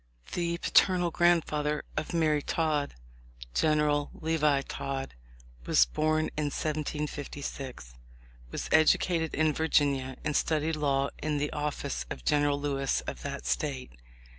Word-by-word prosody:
The 170 Hz, -1 st, -1 dB
paternal 180 Hz, 0 st, +3 dB
grandfather 155 Hz, -4 st, +2 dB
of 155 Hz, -, -3 dB
Mary 155 Hz, -3 st, +2 dB
Todd, 150 Hz, -2 st, -1 dB, 0.6 s
General 150 Hz, -, +2 dB
Levi 150 Hz, -3 st, +1 dB
Todd, 135 Hz, -1 st, -4 dB, 0.5 s
was -, -, +5 dB
born 155 Hz, -, 0 dB
in 150 Hz, -, -1 dB
1756, 145 Hz, -, -4 dB, 0.6 s
was -, -, -4 dB
educated 160 Hz, +1 st, +3 dB
in 155 Hz, 0 st, +2 dB
Vir 160 Hz, +2 st, -1 dB
ginia, 135 Hz, -4 st, +2 dB
and 150 Hz, -1 st, 0 dB
studied 155 Hz, 0 st, +1 dB
law 140 Hz, -2 st, +1 dB
in 150 Hz, -1 st, -1 dB
the 145 Hz, +1 st, -2 dB
office 140 Hz, -, -3 dB
of 60 Hz, -, -7 dB
General 145 Hz, -1 st, +2 dB
Lewis 135 Hz, -2 st, 0 dB
of -, -, -6 dB
the -, -, -4 dB
State. 65 Hz, -1 st, -2 dB
150 Hz, 125 wpm, -29 LUFS, 140-155 Hz, 0.6 s, was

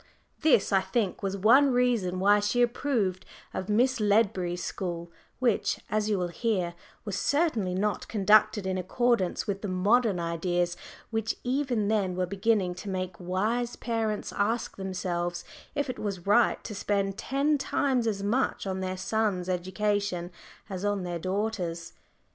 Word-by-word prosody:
This, 280 Hz, -10 st, +3 dB
I 190 Hz, -, +5 dB
think, 190 Hz, +1 st, -1 dB
was 195 Hz, 0 st, -2 dB
one 250 Hz, +8 st, +6 dB
reason 235 Hz, -8 st, +1 dB
why 205 Hz, +2 st, +5 dB
she 210 Hz, +4 st, +2 dB
approved 235 Hz, -7 st, 0 dB, 0.3 s
of 185 Hz, -, -4 dB
Miss 245 Hz, +4 st, +3 dB
Ledbury's 195 Hz, -4 st, +1 dB
school, 170 Hz, -3 st, -4 dB, 0.3 s
which, 240 Hz, -5 st, +1 dB
as 215 Hz, 0 st, +1 dB
you 210 Hz, -, +2 dB
will 180 Hz, -1 st, -1 dB
hear, 185 Hz, -3 st, -1 dB, 0.3 s
was 205 Hz, -3 st, -3 dB
certainly 260 Hz, -, +1 dB
not 205 Hz, +2 st, -1 dB
conducted 210 Hz, 0 st, +4 dB
in 185 Hz, 0 st, -1 dB
accordance 230 Hz, 0 st, +1 dB
with 200 Hz, -1 st, -3 dB
the 210 Hz, -, -3 dB
modern 200 Hz, +2 st, +2 dB
ideas 175 Hz, +1 st, -1 dB, 0.4 s
which 225 Hz, 0 st, -1 dB
even 250 Hz, -5 st, 0 dB
then 200 Hz, -4 st, +1 dB
were 185 Hz, 0 st, 0 dB
beginning 200 Hz, -1 st, +1 dB
to 205 Hz, -, -6 dB
make 185 Hz, -2 st, -4 dB
wise 215 Hz, +7 st, -1 dB
parents 225 Hz, -3 st, -2 dB
ask 220 Hz, +3 st, 0 dB
themselves 175 Hz, -2 st, -3 dB, 0.3 s
if 285 Hz, 0 st, 0 dB
it 255 Hz, -, -5 dB
was 195 Hz, -4 st, -4 dB
right 220 Hz, +4 st, +3 dB
to 215 Hz, -, -6 dB
spend 195 Hz, -1 st, -1 dB
ten 285 Hz, +3 st, +1 dB
times 260 Hz, -4 st, +1 dB
as 200 Hz, -3 st, -1 dB
much 240 Hz, +4 st, 0 dB
on 190 Hz, -1 st, -2 dB
their 185 Hz, 0 st, -3 dB
sons' 190 Hz, -2 st, 0 dB
education 185 Hz, 0 st, -1 dB, 0.4 s
as 190 Hz, -2 st, -5 dB
on 205 Hz, -2 st, 0 dB
their 175 Hz, -1 st, -3 dB
daughters'. 185 Hz, -3 st, -3 dB
200 Hz, 155 wpm, -28 LUFS, 185-225 Hz, 0.4 s, one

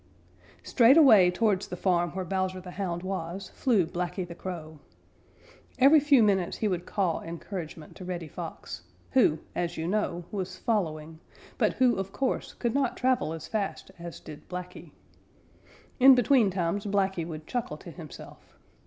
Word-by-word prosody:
_ -, -, -25 dB
Straight 250 Hz, +5 st, +6 dB
away 215 Hz, -, +7 dB
towards 200 Hz, 0 st, +1 dB
the 180 Hz, -, -6 dB
farm 175 Hz, -2 st, +1 dB
where 190 Hz, -1 st, -3 dB
Bowser 185 Hz, +1 st, -2 dB
the 180 Hz, 0 st, -9 dB
Hound 175 Hz, -2 st, -3 dB
was 185 Hz, 0 st, -4 dB
flew 220 Hz, -9 st, +2 dB
Blacky 180 Hz, +2 st, -4 dB
the 170 Hz, -, -8 dB
Crow. 160 Hz, -4 st, -7 dB, 1.0 s
Every 280 Hz, +4 st, +7 dB
few 280 Hz, -4 st, +5 dB
minutes 190 Hz, -4 st, +1 dB
he 215 Hz, -, 0 dB
would 180 Hz, -3 st, -2 dB
caw 185 Hz, -5 st, 0 dB
encouragement 165 Hz, -2 st, -7 dB
to 185 Hz, -, -9 dB
Reddy 175 Hz, -3 st, -4 dB
Fox, -, -, -7 dB, 0.3 s
who, 235 Hz, -12 st, +4 dB, 0.2 s
as 175 Hz, -1 st, -3 dB
you 160 Hz, +1 st, -3 dB
know, 180 Hz, -3 st, -1 dB
was 185 Hz, -2 st, -4 dB
following, 160 Hz, -8 st, -2 dB, 0.4 s
but -, -, +2 dB
who 255 Hz, -2 st, +3 dB
of 195 Hz, 0 st, -4 dB
course 265 Hz, +4 st, -2 dB
could 235 Hz, -2 st, -1 dB
not 275 Hz, -3 st, 0 dB
travel 255 Hz, -10 st, +1 dB
as 165 Hz, -1 st, -6 dB
fast 200 Hz, -3 st, -3 dB
as 170 Hz, 0 st, -8 dB
did 150 Hz, -, -12 dB
Blacky. 180 Hz, -2 st, -7 dB, 1.1 s
In 265 Hz, +1 st, +9 dB
between 245 Hz, -3 st, +4 dB
times 190 Hz, +2 st, -2 dB
Blacky 195 Hz, -3 st, 0 dB
would 155 Hz, -2 st, -7 dB
chuckle 245 Hz, +4 st, -3 dB
to -, -, -11 dB
himself. -, -, -12 dB
185 Hz, 160 wpm, -28 LUFS, 170-215 Hz, 1.1 s, In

